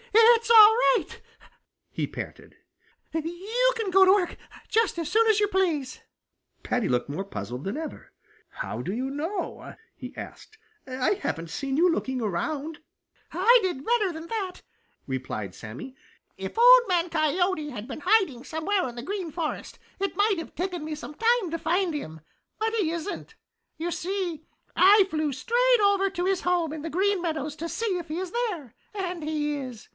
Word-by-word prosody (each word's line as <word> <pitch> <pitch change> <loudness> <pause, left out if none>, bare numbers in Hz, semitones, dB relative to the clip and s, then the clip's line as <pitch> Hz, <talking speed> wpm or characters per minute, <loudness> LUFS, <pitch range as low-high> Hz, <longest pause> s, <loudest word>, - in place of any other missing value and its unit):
"It's 455 +1 +6
all 445 -1 +9 0.2
right," - - -7 0.7
he - - -2
panted. - - -8 0.6
"You 385 +11 0
can 435 -4 -2
go 385 +1 +7
to 375 - +6
work 380 -3 +1 0.3
just 445 -5 +1
as 335 -2 -2
soon 450 +1 +4
as 435 -2 +4
you 415 - +3
please." 340 -10 -1 0.6
Paddy 245 -6 0
looked 125 +2 0
more 155 +7 -3
puzzled 125 - -6
than 195 - -3
ever. 320 0 -7 0.4
"How - - -5
do - - -4
you 255 +5 -3
know?" 320 +8 -4 0.2
he - - -9
asked. 435 - -10 0.3
"I 255 0 0
haven't 165 - -4
seen 275 - -2
you 345 +3 +5
looking 265 -5 -2
around." 310 - -3 0.5
"I 440 +9 +5
did 350 -8 -3
better 450 -5 +2
than 320 0 -8
that," 390 -4 -4 0.4
replied 125 -8 -4
Sammy. 120 - -9 0.4
"If - - -6
Old - - +9
Man 355 -2 +1
Coyote 315 0 +1
had 235 -4 -7
been 270 +2 -7
hiding 365 - +2
somewhere 345 +5 -1
in 240 - -11
the 240 - -6
Green 380 +1 -4
Forest, 325 -1 -4 0.2
it 395 -1 -2
might 405 -3 +2
have 330 - -8
taken 355 -2 -3
me 310 0 -4
some 300 - -8
time 455 -1 +1
to 330 - -2
find 355 +2 0
him. 160 - -6 0.4
But 445 +1 -1
he 410 -8 +1
isn't. 340 +6 -5 0.4
You 340 +2 -3
see, 350 -4 -3 0.3
I 395 +2 +7
flew 310 -2 -1
straight 485 - +2
over 395 -1 +3
to 360 -2 -3
his 380 -1 +1
home 345 -3 0
in 315 - -6
the 325 - -5
Green 385 +4 +1
Meadows 310 -3 -3
to 335 +2 -4
see 415 -4 -1
if 335 - -8
he 315 +1 -4
is 370 -1 -4
there, 380 - -3 0.2
and 365 -4 -4
he 300 -1 -1
is. 255 -5 -8
345 Hz, 175 wpm, -26 LUFS, 295-405 Hz, 0.7 s, all